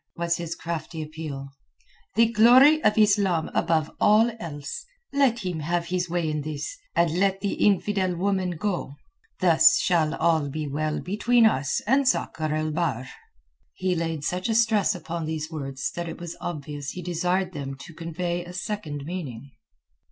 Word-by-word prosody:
was 170 0 0
his 170 -1 -4
crafty 165 0 -5
appeal. 150 -3 -7 0.7
"The 230 +1 +6
glory 255 +7 +6
of 210 0 +3
Islam 200 -6 +3
above 160 -2 +1
all 220 +3 +5
else! 160 - -6 0.3
Let 255 -7 +2
him 180 -3 -2
have 170 +3 -1
his 180 0 -2
way 170 -1 0
in 155 -1 -1
this, 155 - -5 0.2
and 170 -2 +3
let 195 0 +1
the 200 - -1
infidel 195 -2 +2
woman 185 -1 -1
go. 180 -6 -3 0.5
Thus 335 +1 +6
shall 165 - +2
all 160 -3 +2
be 155 +1 -4
well 150 +2 -2
between 230 +5 +3
us 140 -10 +1
and 265 +4 +3
Sakr 155 - 0
el 155 0 -1
Bahr!" 150 -6 -2 0.7
He 185 0 0
laid 165 -3 -2
such 180 +7 -2
a 225 - +1
stress 220 -3 +3
upon 170 -1 -5
these 155 0 -4
words 135 -4 -4
that 170 -1 -5
it 165 - -8
was 170 -1 -6
obvious 145 -4 -5
he 180 +6 -6
desired 180 +2 -1
them 135 -3 -5
to 170 - -11
convey 170 +2 -3
a 175 +1 -10
second 180 -7 -4
meaning. 140 -7 -6
170 Hz, 165 wpm, -25 LUFS, 155-200 Hz, 0.7 s, The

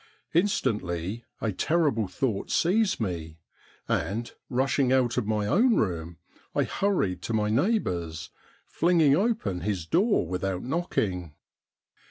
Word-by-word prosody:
Instantly 110 - 0 0.2
a 110 - 0
terrible 145 - +1
thought 100 +2 -2
seized 195 +4 +2
me, 85 -6 -4 0.5
and 105 +9 -1 0.2
rushing 130 0 +1
out 125 -2 +3
of 105 - -1
my 105 -1 0
own 230 - +4
room, 85 -4 -1 0.4
I - - +3
hurried 105 - 0
to 115 - -4
my 105 -1 +1
neighbour's, 90 - 0 0.3
flinging 165 -4 +3
open 175 - 0
his 95 -3 -2
door 195 - +2
without 90 +1 -2
knocking. 95 - -2
110 Hz, 120 wpm, -27 LUFS, -, 0.5 s, own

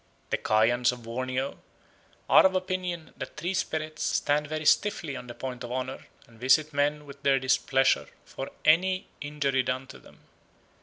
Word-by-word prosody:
The - - +2
Kayans 120 +3 +3
of 125 -1 -9
Borneo 130 +3 -3 0.7
are - - +7
of 190 0 +4
opinion 185 -3 -3
that - - -7
tree 175 +5 -2
spirits 155 -4 -3
stand 150 +1 +1
very 155 +1 -4
stiffly 170 -6 +2
on 125 - -8
the 120 - -8
point 125 -2 -6
of 120 - -6
honour 130 +1 -4 0.2
and 115 -1 -20
visit 150 +5 +3
men 145 +1 0
with 140 0 -12
their 140 -1 +4
displeasure 135 0 +2 0.2
for 135 - -7 0.2
any 185 +4 +4 0.2
injury 145 -2 0
done 130 +1 -2
to - - -12
them. - - -19
140 Hz, 165 wpm, -28 LUFS, 130-155 Hz, 0.7 s, are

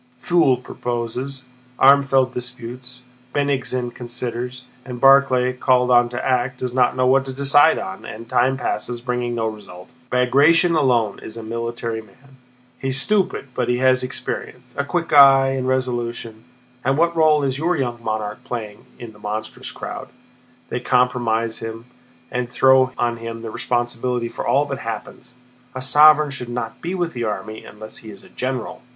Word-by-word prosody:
Pfuel 165 -5 +3
proposes, 125 +3 -4 0.3
Armfeldt 135 -1 +4
disputes, 125 0 -8 0.3
Bennigsen 130 -4 -1
considers, 125 +1 -5 0.2
and 125 -1 -7
Barclay, 135 -1 +5
called 125 -1 +2
on 120 -1 +5
to 120 +1 -5
act, 125 0 0
does 125 -1 -4
not 125 -1 +2
know 130 0 +1
what 130 +1 +4
to 130 - -5
decide 140 +3 +5
on, 95 0 -6
and 115 +1 -9
time 130 +2 +2
passes 120 -1 -3
bringing 125 -1 -2
no 115 -1 -1
result. 105 -3 -8 0.2
Bagratión 145 +7 +4
alone 120 -8 +1
is 110 - -9
a 115 - -7
military 115 0 -4
man. 130 +6 -21 0.4
He's 135 0 -1
stupid, 195 -6 0
but 125 -1 -1
he 125 - +2
has 130 0 +3
experience, 125 0 -6
a 140 - -1
quick 165 +2 -2
eye, 135 -2 +7
and 130 -1 -2
resolution.... 120 -3 -3 0.4
And 135 +2 +1
what 170 +1 +2
role 155 -2 +4
is 135 0 -1
your 175 +2 +1
young 120 -3 -3
monarch 110 -1 -3
playing 110 -4 -6
in 120 -2 -9
that 105 -1 -19
monstrous 110 +1 -5
crowd? - - -7 0.6
They - - -2
compromise 120 -3 +1
him 115 +1 -7 0.5
and 125 -1 -2
throw 130 0 +4
on 120 -1 0
him 115 0 -7
the 115 - -5
responsibility 120 0 -2
for - - -6
all 145 +2 +3
that 140 -2 -5
happens. 115 +2 -7 0.4
A 130 - -4
sovereign 150 +2 +6
should 125 -3 -6
not 120 -2 -5
be 175 +3 -3
with 175 -2 -2
the 120 -1 -3
army 110 0 -5
unless 110 +1 -11
he 110 - -11
is - - -12
a - - -17
general!" 130 -2 -4
125 Hz, 165 wpm, -21 LUFS, 115-135 Hz, 0.6 s, eye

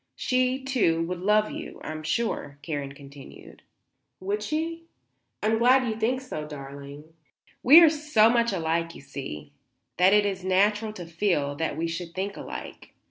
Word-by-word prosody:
She, 255 +1 0
too, 210 -12 +1
would 180 +1 -4
love 210 +3 +2
you, - - -8
I - - -5
am 155 0 -6
sure," 155 -5 -2
Karen 145 -3 -4
continued. 140 -1 -13 0.6
"Would 200 +3 -2
she? 325 +6 -3 0.6
I'm 220 +1 +2
glad 255 +2 +4
you 220 - -1
think 235 +4 0
so, 155 -13 -6
darling." 140 +1 -10 0.5
"We 305 +7 +9
are 330 - +8
so 295 -8 +3
much 235 0 +2
alike, 165 -2 -1
you - - -11
see, 75 - -8 0.5
that 185 +2 +5
it 210 0 +4
is 190 -2 -2
natural 210 +4 +2
to 180 -5 -8
feel 170 -4 0
sure 145 - -6
that 160 +1 -2
we 165 +1 -1
should 170 0 -6
think 195 +2 -3
alike. - - -9
190 Hz, 170 wpm, -26 LUFS, 155-235 Hz, 0.6 s, We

